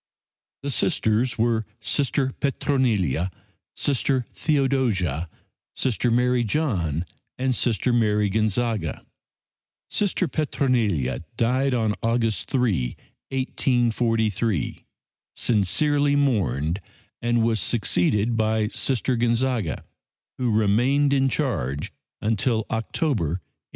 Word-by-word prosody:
The 140 - -2
Sisters 115 0 +1
were 115 0 +2 0.2
Sister 135 +2 0
Petronilla, 110 - +1 0.5
Sister 135 -2 0
Theodosia, 120 - 0 0.5
Sister 125 -1 0
Mary 125 +1 +2
John 95 - 0 0.3
and 130 0 +1
Sister 120 +1 +1
Mary 105 -3 +2
Gonzaga. 110 - -1 0.9
Sister 195 -3 0
Petronilla 115 - 0 0.2
died 130 +3 +2
on 110 -3 +1
August 115 -1 0
3, 105 - 0 0.3
1843, 115 - 0 0.5
sincerely 145 +7 +2
mourned, 90 - +1 0.4
and 120 -1 +2
was 115 -1 +1
succeeded 105 +3 +1
by 110 -1 +1
Sister 130 +1 0
Gonzaga, 120 -5 0 0.6
who 125 -2 +1
remained 120 +7 +3
in 135 -1 +3
charge 80 - -2 0.3
until 110 +1 +1
October, 115 - 0
1844. 85 +5 -3
115 Hz, 90 wpm, -24 LUFS, 105-130 Hz, 0.9 s, remained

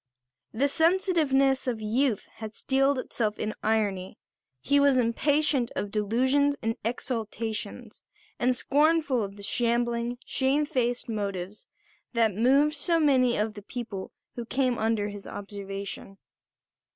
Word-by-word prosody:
The 265 +6 +1
sensitiveness 305 -6 +2
of 235 -3 -1
youth 225 +1 0
had 220 -1 -7
steeled 270 +1 +2
itself 220 -4 -2
in 215 - -3
irony; 205 -4 -1 0.4
he 285 - +2
was 280 -2 +4
impatient 265 +2 +2
of 205 - -3
delusions 260 +7 +2
and 225 0 0
exaltations, 225 -1 -4 0.4
and 250 +1 +2
scornful 295 -1 +2
of 200 -1 -5
the 200 - -10
shambling, 235 +2 0
shame 275 +3 +1
faced 245 -4 -1
motives 200 -3 -4 0.5
that 225 -3 +2
moved 270 +8 +3
so 330 +3 +1
many 260 -5 +3
of 215 +1 -1
the 205 - -9
people 210 -3 -6 0.2
who 240 - -5
came 255 +1 0
under 220 -2 0
his 205 -1 -9
observation. 200 -1 -7
240 Hz, 125 wpm, -27 LUFS, 215-275 Hz, 0.5 s, was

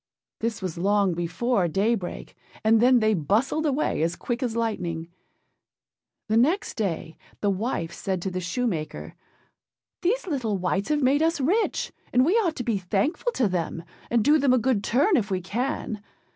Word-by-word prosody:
This 220 -3 -2
was 175 -3 -4
long 200 0 +2
before 175 +5 0
daybreak; 195 +2 -1 0.3
and 220 +1 +4
then 250 0 +5
they 215 0 +3
bustled 225 - +1
away 285 - 0
as 165 +1 0
quick 240 +7 -3
as 240 -3 -1
lightning. 175 -8 -2 1.2
The 220 +1 +2
next 320 - +2
day 170 -7 -3 0.2
the 205 - +2
wife 190 -5 -2
said 190 -2 -2
to 190 - -2
the 185 0 -3
shoemaker. 175 -3 -3 0.9
âThese 435 +8 +1
little 250 - -1
wights 185 +5 -1
have 300 -2 +1
made 275 +3 +3
us 325 0 +2
rich, 370 - +1 0.2
and 250 +1 +4
we 345 - +3
ought 350 -8 +1
to 245 - -3
be 225 -4 0
thankful 205 - 0
to 245 - +2
them, 170 -2 -2 0.3
and 235 -2 +2
do 300 +5 +5
them 275 -2 +3
a - - +5
good 235 -4 +1
turn 300 - +3
if 215 -2 -1
we 190 -2 0
can. 220 +2 -3
225 Hz, 170 wpm, -25 LUFS, 185-265 Hz, 1.2 s, then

